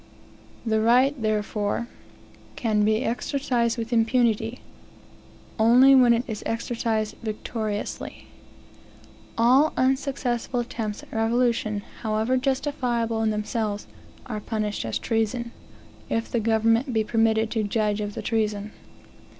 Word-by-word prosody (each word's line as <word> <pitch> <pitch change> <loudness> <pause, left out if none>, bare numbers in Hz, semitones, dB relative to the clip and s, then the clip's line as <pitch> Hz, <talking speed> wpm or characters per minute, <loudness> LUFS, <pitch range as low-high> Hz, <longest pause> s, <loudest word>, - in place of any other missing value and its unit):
The 220 -1 +1
right, 250 +5 +4
therefore, 215 +1 -1 0.7
can 215 -4 +1
be 215 +3 +2
exercised 245 -1 0
with 230 +1 -4
impunity, 225 0 +1 1.0
only 245 +5 +7
when 250 -3 +6
it 235 +1 +3
is 220 -3 -5
exercised 225 -2 -2
victoriously. 215 -1 -4 1.1
All 255 +7 +4
unsuccessful 255 -2 0
attempts 220 -3 -5
at - - -14
revolution, 225 -2 +1 0.2
however 220 +3 0
justifiable 255 -4 -1
in 220 - +2
themselves, 210 -1 -2 0.4
are 215 -4 -4
punished 210 - -3
as 110 - -1
treason, 230 +1 -1 0.6
if 225 0 -2
the 235 - +1
government 225 +3 +2
be 220 -1 +2
permitted 220 0 +1
to 225 - 0
judge 210 0 0
of 205 0 -4
the - - -5
treason. 215 -2 -1
225 Hz, 115 wpm, -25 LUFS, 215-240 Hz, 1.1 s, only